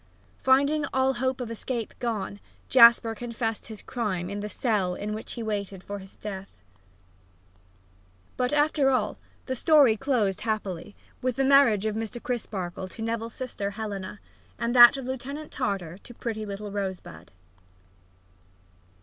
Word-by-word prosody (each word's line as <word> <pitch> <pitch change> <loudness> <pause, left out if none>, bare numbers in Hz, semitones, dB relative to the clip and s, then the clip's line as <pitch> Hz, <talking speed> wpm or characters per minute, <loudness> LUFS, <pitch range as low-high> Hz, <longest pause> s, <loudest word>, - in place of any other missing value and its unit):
Finding 280 +3 +3
all 265 0 +3
hope 260 +1 -1
of 240 -2 -4
escape 230 0 -4
gone, 215 -4 -3 0.3
Jasper 235 -2 +7
confessed 230 -1 -4
his 220 -2 -9
crime 195 -7 -3
in 205 - -4
the 210 +1 -4
cell 205 -7 0
in 210 +2 -4
which 215 - -6
he 235 - -5
waited 200 -3 -4
for 205 0 -6 0.2
death. 195 -2 -6 1.9
But, 250 0 0
after 295 -1 +3
all, 235 -6 0 0.3
the 260 - -2
story 280 -4 +5
closed 220 -6 0
happily, 205 -4 -3 0.3
with 255 -1 0
the 270 - +1
marriage 265 -7 +5
of 215 -1 -1
Mr. 225 +2 -4
Crisparkle 190 -7 -4
to 225 +4 -8
Neville's 230 0 -3
sister 240 -6 -4
Helena, 200 -2 -6 0.4
and 235 0 -1
that 240 +2 +10
of 270 - -6
Lieutenant 275 +4 -5
Tartar 195 - -3
to 240 - -12
pretty 220 -3 -4
little 200 +1 -6
Rosebud. 190 - -5
225 Hz, 140 wpm, -27 LUFS, 200-255 Hz, 1.9 s, that